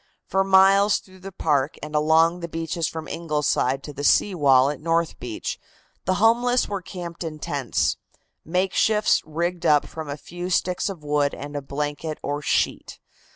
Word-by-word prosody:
For 195 0 +1
miles 195 +1 +5
through 185 -1 -15
the 195 +1 -9
park 150 -5 0
and 150 0 -7
along 160 +3 +3
the 170 - -5
beaches 165 0 -2
from 160 -1 -6
Ingleside 150 -4 -1
to 150 - -8
the 145 0 -6
sea 200 +6 +4
wall 140 -4 +4
at 150 - -7
North 165 0 0
Beach 120 -3 -5 0.5
the 185 - +1
homeless 240 +4 +3
were 200 -2 -4
camped 175 -2 -7
in 160 -2 -5
tents 140 -4 -1 0.5
makeshifts 190 +5 +2
rigged 170 +3 -3
up 150 -1 +4
from 160 -2 -8
a 140 - -4
few 175 +3 -7
sticks 180 +1 0
of 180 -6 -8
wood 145 -1 0
and 145 +1 -8
a 145 - -2
blanket 150 +3 -4
or 145 +1 -2
sheet. - - -1
165 Hz, 170 wpm, -24 LUFS, 145-185 Hz, 0.5 s, miles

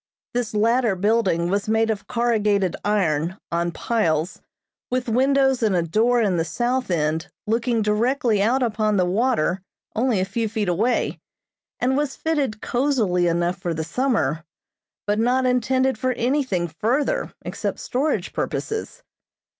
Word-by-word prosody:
This 240 -3 -2
latter 230 0 +2
building 185 -4 +1
was 200 +1 -1
made 225 0 +2
of 210 - -5
corrugated 210 -6 +1
iron, 180 -4 0
on 170 0 0
piles, 170 -5 -1 0.5
with 250 0 -1
windows 265 +2 +2
and 215 -4 +2
a 175 - +2
door 225 +9 +2
in 190 -4 +1
the 165 - +1
south 245 +6 -1
end 160 0 0 0.2
looking 230 +1 +1
directly 220 +1 +1
out 250 +5 +2
upon 215 -2 +1
the 180 - +3
water 190 -2 +1 0.3
only 230 -2 +1
a 185 - +1
few 220 +3 -2
feet 215 -2 -2
away, 215 +8 0 0.6
and 260 +2 +1
was 290 -1 -1
fitted 285 -9 -1
cosily 230 -10 +1
enough 175 +2 0
for 175 -2 -2
the 160 - -2
summer, 165 - 0 0.6
but 210 +1 0
not 250 +3 +2
intended 255 0 +1
for 255 +1 0
anything 245 -8 0
further 270 - -1
except - - -3
storage 280 +5 -1
purposes. 445 +3 -4
220 Hz, 145 wpm, -23 LUFS, 185-250 Hz, 0.6 s, the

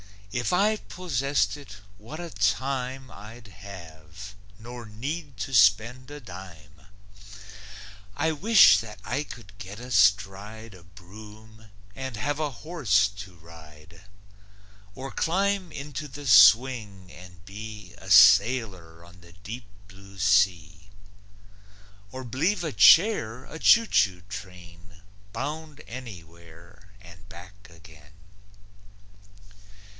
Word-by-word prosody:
If 125 +6 -2
I 210 +4 +2
possessed 145 - -2
it, 125 -9 -12 0.2
what 130 +10 -10
a 170 -1 -7
time 130 -1 -2
I'd 110 +2 -13
have, 90 0 -12 0.2
nor 120 +2 -10
need 135 +5 -6
to 115 +6 -5
spend 115 +4 +3
a 145 0 -9
dime! 90 - -13 1.3
I 160 - 0
wish 200 +8 +6
that 105 -3 -9
I 135 +7 -3
could 110 -8 -13
get 100 +1 -9
astride 105 -1 0
A 90 -2 -16
broom, 105 +4 -15 0.3
and 130 -3 -6
have 145 +7 -3
a 155 -1 -1 0.2
horse 110 - +1
to 95 -2 -10
ride; 80 +1 -16 0.9
Or 135 +1 -7
climb 190 +1 -1
into 150 +1 -7
the 145 +2 -10
swing, 105 -3 +4
and 90 0 -15
be 105 -1 -10
A 95 - -12
sailor 95 -4 +4
on 90 +1 -18
the 85 0 -17
deep 110 +6 -9 0.2
blue 100 -1 -16
sea, 95 -2 +1 1.2
Or 130 0 -8
b'lieve 145 - -1
a 160 - -3
chair 125 - +4
a 160 - -10
choo 230 +6 +5
choo 95 - +1
train, 90 -3 -12 0.3
Bound 150 +4 -6
anywhere 85 -5 -13
and 85 -1 -16
back 95 +3 -14
again. 80 -3 -18
105 Hz, 115 wpm, -25 LUFS, 90-130 Hz, 1.3 s, wish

